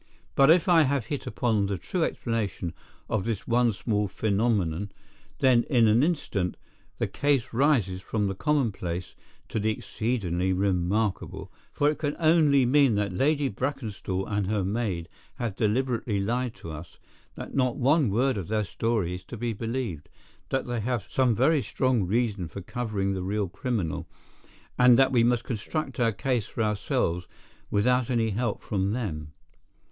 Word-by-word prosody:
But 135 +1 +5
if 165 0 +5
I 170 -2 +6
have 140 -5 +1
hit 140 -2 -4
upon 110 -3 +1
the 100 -1 -2
true 180 - -2
explanation 105 - -2 0.3
of 110 -4 -1
this 115 -2 -3
one 120 0 +3
small 105 0 -1
phenomenon, 100 -3 0 0.5
then 125 -3 +5
in 120 -6 +4
an 110 +3 +4
instant 140 - -1 0.4
the - - 0
case 140 -4 0
rises 115 - +2
from 105 +1 -1
the 95 - -1
commonplace 95 - -1 0.4
to - - -1
the 110 +1 +1
exceedingly 95 -5 -1
remarkable, 95 +2 -1 0.2
for 145 - +1
it 150 - +1
can 145 -1 -1
only 155 -5 +4
mean 135 -2 +4
that 100 -2 -1
Lady 145 +6 +2
Brackenstall 110 -6 -3
and 100 -2 -1
her 105 -1 0
maid 95 -4 -2 0.3
have 115 -5 -3
deliberately 115 -1 0
lied 120 +4 -1
to 85 - -9
us, 80 +2 -9 0.4
that - - -8
not 130 -2 +1
one 140 0 +3
word 125 +4 +1
of 90 - -6
their 110 0 0
story 105 -3 -1
is 90 0 -7
to 120 - -8
be 120 +1 -2
believed, 115 - -4 0.4
that 135 - 0
they 120 -1 -2
have 120 0 -2
some 125 -4 +2
very 140 +6 +3
strong 125 -7 0
reason 105 -3 0
for 100 +5 -8
covering 100 -2 -2
the 95 - -3
real 100 +2 -1
criminal, 95 -2 -3 0.7
and 125 -1 +7
that 135 0 +4
we 120 -3 +4
must 120 0 +2
construct 135 +4 -4
our 115 -2 +3
case 120 0 -1
for 115 - -2
ourselves 90 -4 -1 0.4
without 125 +4 +2
any 115 -3 +1
help 115 +1 -2
from 100 0 -1
them. 75 -11 -4
115 Hz, 160 wpm, -27 LUFS, 100-130 Hz, 0.7 s, and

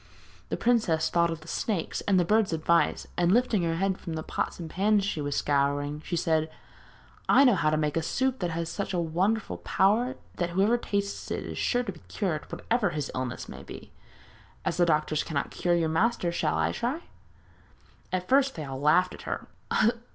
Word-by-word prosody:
The - - -2
princess 220 -10 +2
thought 170 0 +3
of 165 -1 -4
the 155 - -14
snakes, 190 -1 -2
and 195 -2 +4
the 175 - +2
bird's 210 -1 +2
advice, 165 +1 +2
and 175 0 +3
lifting 235 -2 +3
her 165 -1 0
head 190 +2 0
from 165 - -6
the 160 0 -3
pots - - -3
and 170 - -5
pans 200 +4 +2
she 180 -7 -2
was 145 -1 -2
scouring, 145 +1 0
she 175 - -3
said: 160 -1 +1 0.8
'I 275 - +7
know 250 -4 +6
how 165 -5 +2
to 155 - +1
make 150 -1 0
a 165 - +1
soup 260 +9 0
that 175 - -1
has 165 0 -3
such 190 +3 -3
a - - +1
wonderful 185 +7 0
power 235 +7 +2 0.2
that 175 -1 0
whoever 195 +6 +3
tastes 200 -4 -3
it - - -2
is - - -6
sure 245 0 +1
to 215 - -4
be 170 - -14
cured, 170 -7 -3
whatever 225 -4 0
his 150 -4 -3
illness 130 -1 -4
may - - -9
be. - - -11 0.7
As - - -1
the 175 -1 +4
doctors 155 -1 +1
cannot 145 -4 -3
cure 175 -1 +1
your 165 -2 +1
master 175 +1 +1
shall 160 -2 0
I - - +1
try?' 265 +8 -2 1.1
At 185 -1 -2
first 270 0 +3
they 155 - -5
all 135 0 -6
laughed 180 +5 +4
at - - -10
her. - - -3
175 Hz, 205 wpm, -28 LUFS, 160-210 Hz, 1.1 s, I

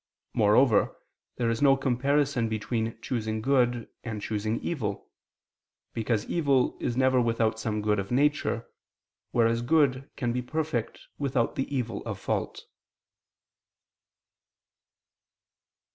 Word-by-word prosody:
Moreover, 110 +2 +4 0.4
there 115 -2 0
is 115 - -2
no 135 -1 +6
comparison 135 -1 +1
between 110 +1 -2
choosing 110 -3 -2
good 120 -1 +1 0.2
and 110 -3 -4
choosing 110 +2 -2
evil: 110 -12 -3 0.8
because 110 -1 -1
evil 140 -6 +2
is 120 - -2
never 130 -1 +4
without 115 -1 +1
some 105 -2 -2
good 105 -1 +2
of 95 - -4
nature, 140 -3 +1 0.6
whereas 115 0 +2
good 135 0 +2
can 120 -3 -1
be 125 - -1
perfect 150 -3 -3 0.2
without 135 -4 0
the 135 - -2
evil 120 -6 -2
of - - -4
fault. - - -3
120 Hz, 115 wpm, -28 LUFS, 110-135 Hz, 0.8 s, no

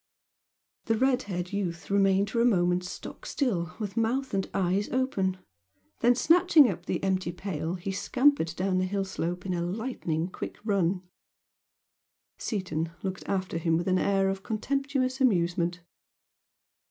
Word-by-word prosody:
The 225 -1 +1
red 260 +1 +3
haired 180 0 -3
youth 180 -3 -3
remained 195 0 +3
for 235 - +1
a - - +4
moment 180 -6 +3
stock 180 - -8
still 180 - -1
with 205 -2 -4
mouth 245 +3 0
and 195 -1 -1
eyes 195 +2 0
open, 205 -8 0 0.6
then, 240 +1 +4
snatching 320 0 +6
up - - -4
the - - -2
empty 190 -2 0
milk 175 - -7
pail 175 -3 -3
he 190 +2 -4
scampered 250 - +2
down 185 0 0
the 185 - +1
hill 195 +1 -1
slope 180 -1 -3
at 190 - -2
a 175 - -1
lightning 175 -4 -2
quick 185 - -6
run. 190 -3 +1 1.4
Seaton 170 -7 -2
looked 190 -1 -4
after 185 -3 -1
him 165 -1 +2
with 170 - -2
an 185 0 +3
air 195 -1 +2
of 195 0 -2
contemptuous 265 +4 -1
amusement. 175 -6 +2
195 Hz, 155 wpm, -28 LUFS, 180-230 Hz, 1.4 s, snatching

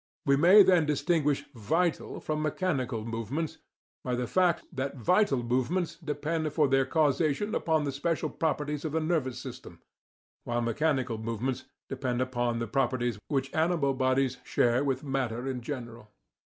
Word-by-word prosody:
We 140 - +4
may 180 +8 +8
then 180 -5 +4
distinguish 145 -1 +1
"vital" 160 - -1
from 155 0 -2
mechanical 140 - -1
movements 115 +8 -3 0.4
by 125 - -1
the 125 0 -1
fact 175 +4 +2
that 135 -1 -3
vital 135 - +2
movements 155 +9 0
depend 155 0 -2
for 150 -1 +3
their 135 0 +2
causation 155 +6 +1
upon 160 -2 +1
the 140 - -1
special 155 +2 -1
properties 150 -2 -2
of 155 -2 -3
the 160 - +2
nervous 155 -6 -1
system, 125 -9 -9 0.6
while 120 0 -1
mechanical 125 -1 0
movements 115 +3 -3 0.2
depend 130 -2 -2
only 125 - +1
upon 120 -2 -1
the 115 - -2
properties 120 -2 0
which 135 -2 -1
animal 160 -4 +2
bodies 130 0 +1
share 120 +3 +2
with 135 -1 -1
matter 130 -3 -2
in 130 -2 -3
general. 120 -4 -7
135 Hz, 155 wpm, -29 LUFS, 125-155 Hz, 0.6 s, may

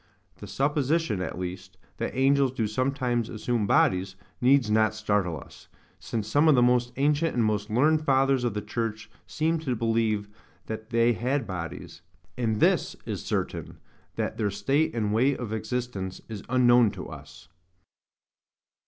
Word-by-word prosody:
The - - -10
supposition, 145 - 0
at 90 - -4
least, 95 +1 -6 0.2
that - - -4
angels 135 0 +3
do 115 -4 -1
sometimes 125 0 -1
assume 115 -1 -1
bodies, 95 0 +2 0.3
needs 125 -3 +4
not 110 0 +3
startle 105 -7 0
us; - - -15 0.3
since 110 -2 -4
some 145 +8 +3
of 155 - +6
the 125 - +4
most 125 0 +2
ancient 150 +4 +1
and 120 -2 +2
most 105 0 -1
learned 150 +8 +3
Fathers 135 -2 +2
of 120 -4 -1
the 105 - -3
church 110 -1 -4 0.2
seemed 160 +1 0
to 130 -6 -1
believe 110 -2 0 0.4
that 110 0 -6
they 115 0 +3
had 125 +6 -1
bodies: 90 -3 -7 0.3
and 110 -4 -1
this - - +2
is - - -4
certain, - - -3 0.4
that - - -3
their 105 -2 0
state 125 +10 0
and 105 -2 0
way 130 +5 +2
of 115 -3 -5
existence 110 -4 -4
is 110 -3 -7
unknown 120 -2 +5
to - - -8
us. - - -12
115 Hz, 155 wpm, -27 LUFS, 105-135 Hz, 0.4 s, of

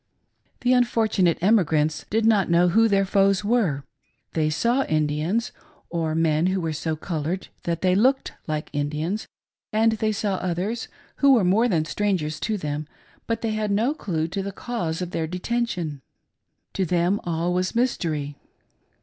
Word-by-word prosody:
The 250 +1 +3
unfortunate 220 -8 +2
emigrants 160 -7 +2
did 220 +1 +1
not 210 -5 +3
know 175 +1 +4
who 225 +5 +4
their 195 -2 +2
foes 195 0 +2
were. 200 - +1 0.5
They 155 -2 +1
saw 235 - +1
Indians, 155 +9 0 0.4
or 165 -2 -1
men 160 +1 +2
who 190 +1 0
were 165 -3 -2
so 160 +1 -2
colored 165 +2 -3 0.2
that 170 -1 -1
they 185 -1 +4
looked 260 +8 +2 0.2
like 155 -1 -3
Indians, 155 +8 -2 0.4
and 225 +1 +3
they 220 0 0
saw 200 -2 -1
others 185 +7 -2 0.3
who 280 -1 +6
were 225 - +3
more 205 +7 +3
than 165 -8 +1
strangers 165 -5 -1
to 215 -1 -1
them, 150 -3 -4 0.4
but 230 0 -1
they 225 - -1
had 215 -1 -1
no 220 +8 +2
clue 165 - -2
to 195 +3 -3
the 200 +1 -4
cause 185 -7 -3
of 175 - -6
their 160 -2 -2
detention. 180 - -2 0.7
To 195 - 0
them 180 +3 +1
all 170 +1 -1
was 185 +3 -1
mystery. 155 - -1
185 Hz, 160 wpm, -24 LUFS, 160-220 Hz, 0.7 s, who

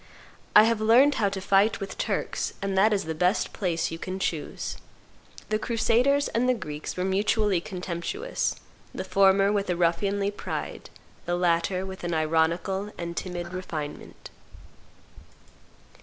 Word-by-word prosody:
I 210 - +10
have 225 -1 +1
learned 245 +7 +6
how 200 - +3
to 195 0 -4
fight 195 +3 +3
with 195 -1 -6
Turks; - - -2
and 195 -1 -2
that 205 +3 +4
is 205 -2 +1
the 160 - -3
best 180 +6 +1
place 170 -5 -1
you 165 - -6
can 185 +1 -4
choose." 165 -5 -3 0.7
The 215 - +1
crusaders 245 +5 +2
and 250 +2 +1
the 255 - +3
Greeks 150 -8 -6
were 180 - 0
mutually 200 -1 +1
contemptuous, 185 - -3 0.4
the - - -3
former 195 +1 +4
with 200 -2 -1
a 180 - +1
ruffianly 195 +4 +1
pride, 205 - -6 0.4
the 175 - +1
latter 175 +2 +1
with 190 -1 -8
an 175 -1 -1
ironical 165 +6 0
and 170 0 -5
timid 175 -1 -5
refinement. 160 -5 -6
190 Hz, 145 wpm, -26 LUFS, 175-210 Hz, 0.7 s, I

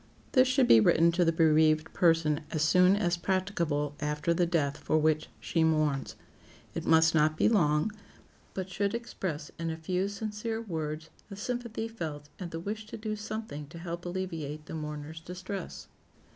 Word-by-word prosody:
This 260 -1 +5
should 260 -1 +3
be 115 - +8
written 165 +9 +5
to 175 +1 +2
the 165 - +3
bereaved 155 -1 +3
person 165 -3 +3
as 155 -2 0
soon 180 +4 +5
as 180 -4 +1
practicable 170 -6 -1
after 150 +2 0
the 175 +1 +2
death 150 -4 0
for 155 - +1
which 155 0 +1
she 165 - 0
mourns. 155 -4 +1 0.6
It - - -4
must 160 0 +5
not 155 0 +3
be - - +4
long, 155 -4 +3 0.6
but 190 -1 -3
should 200 +3 -1
express 185 -10 -4
in 165 0 -2
a 160 - -3
few 180 +4 -1
sincere 215 +2 -4
words 160 -6 -4 0.2
the 200 - -7
sympathy 235 +1 -3
felt, 155 -10 -6
and 180 -3 -5
the 165 - -5
wish 210 +4 -5
to - - -7
do 215 -1 -3
something 215 -9 -6
to 165 +3 -11
help 170 0 -5
alleviate 165 -5 -4
the - - -8
mourner's 150 0 -5
distress. 180 +2 -7
165 Hz, 170 wpm, -30 LUFS, 155-195 Hz, 0.6 s, be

